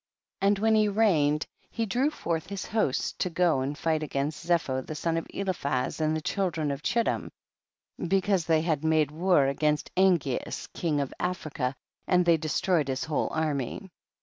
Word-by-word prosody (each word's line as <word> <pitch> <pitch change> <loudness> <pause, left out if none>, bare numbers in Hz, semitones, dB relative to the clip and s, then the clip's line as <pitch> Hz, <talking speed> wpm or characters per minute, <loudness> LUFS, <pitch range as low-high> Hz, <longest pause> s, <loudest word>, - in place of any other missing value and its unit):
3. 195 - +3
And 200 0 +4
when 220 +2 +2
he 215 -1 +4
reigned, 165 -9 +2 0.2
he 230 - -2
drew 250 +8 +1
forth 165 - -3
his 200 0 -5
hosts 215 - 0
to 180 - 0
go 170 -4 +2
and 140 +2 -3
fight 160 -1 0
against 145 0 -3
Zepho 165 -6 +1
the 155 - -7
son 165 +2 -1
of 165 - -2
Eliphaz 145 -9 -2
and 155 0 +1
the - - -4
children 165 -4 -1
of 140 +1 -4
Chittim, 235 +6 0 0.8
because 195 -1 +2
they 160 -1 +3
had 160 -3 0
made 155 -2 +2
war 170 -2 +3
against 150 +2 0
Angeas 175 -8 +1
king 155 -4 0
of 140 - -4
Africa, 155 -7 -2 0.3
and 180 -1 +3
they 170 -1 +5
destroyed 155 0 +1
his 130 -1 -2
whole 160 -2 -1
army. 155 +4 -2
160 Hz, 175 wpm, -28 LUFS, 150-190 Hz, 0.8 s, they